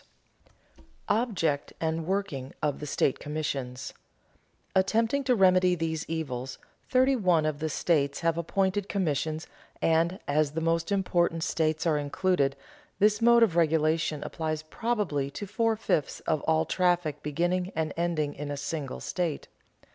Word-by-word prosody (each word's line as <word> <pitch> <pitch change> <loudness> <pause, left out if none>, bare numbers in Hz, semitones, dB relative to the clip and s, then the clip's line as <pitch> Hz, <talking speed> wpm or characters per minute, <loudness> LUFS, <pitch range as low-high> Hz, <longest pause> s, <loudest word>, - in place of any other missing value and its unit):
[Sidenote: - - -31 0.4
Object 160 -9 -1
and 160 0 -2
working 185 -9 -2
of 145 -2 0
the 150 - -6
state 135 - +1
commissions] 140 -4 -4 0.8
Attempting 225 +8 +2
to 250 -1 +3
remedy 185 -2 +4
these 160 -1 -3
evils, 135 -6 -4 0.3
thirty 260 +1 +4
one 180 -9 +2
of 155 -2 -1
the 160 0 -2
states 140 -3 +1
have 165 -1 +2
appointed 190 +4 0
commissions 160 -4 -1 0.3
and, 165 +4 +2
as 145 0 +1
the 160 - -1
most 165 +2 0
important 175 -4 +1
states 160 -2 0
are 155 -3 +2
included, 145 -1 +1 0.4
this 210 +1 +3
mode 235 0 +6
of 190 -7 +2
regulation 160 -2 +2
applies 155 -1 -3
probably 165 -7 -1
to 205 - -6
four 225 +3 +1
fifths 160 -9 -1
of 155 -3 0
all 160 0 +3
traffic 175 -4 +1
beginning 175 +5 -1
and 155 -2 -1
ending 165 -4 -1
in 145 0 -6
a 145 - -3
single 145 -1 -4
state. 170 -5 -3
165 Hz, 145 wpm, -28 LUFS, 150-185 Hz, 0.8 s, mode